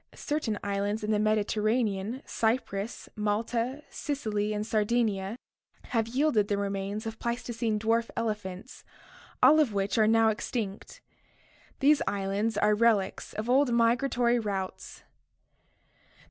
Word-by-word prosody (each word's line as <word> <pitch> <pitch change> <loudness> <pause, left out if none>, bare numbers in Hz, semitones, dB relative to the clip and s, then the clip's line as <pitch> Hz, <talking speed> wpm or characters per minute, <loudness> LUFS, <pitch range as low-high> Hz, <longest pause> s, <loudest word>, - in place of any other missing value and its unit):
Certain 295 -8 -2
islands 205 +2 -1
in 210 - -1
the 210 - +2
Mediterranean, 215 +2 0
Cyprus, 220 -2 -2
Malta, 230 +6 -1
Sicily, 215 -8 -2
and 210 0 -2
Sardinia, 215 -2 0 0.5
have 225 -2 +1
yielded 245 -4 +2
the 205 - 0
remains 200 +2 -3
of 225 0 -6
Pleistocene 235 -2 -2
dwarf 225 +2 +1
elephants, 210 -1 -4 0.6
all 295 +5 +8
of 275 -9 +2
which 200 +3 0
are 215 - +5
now 225 0 +5
extinct. 220 - -4 0.8
These 290 +2 +5
islands 200 +2 -1
are 210 0 +3
relics 210 -3 +1
of 215 +2 -4
old 260 +1 +3
migratory 240 +1 +2
routes. 195 -4 -5
220 Hz, 120 wpm, -28 LUFS, 205-235 Hz, 0.8 s, all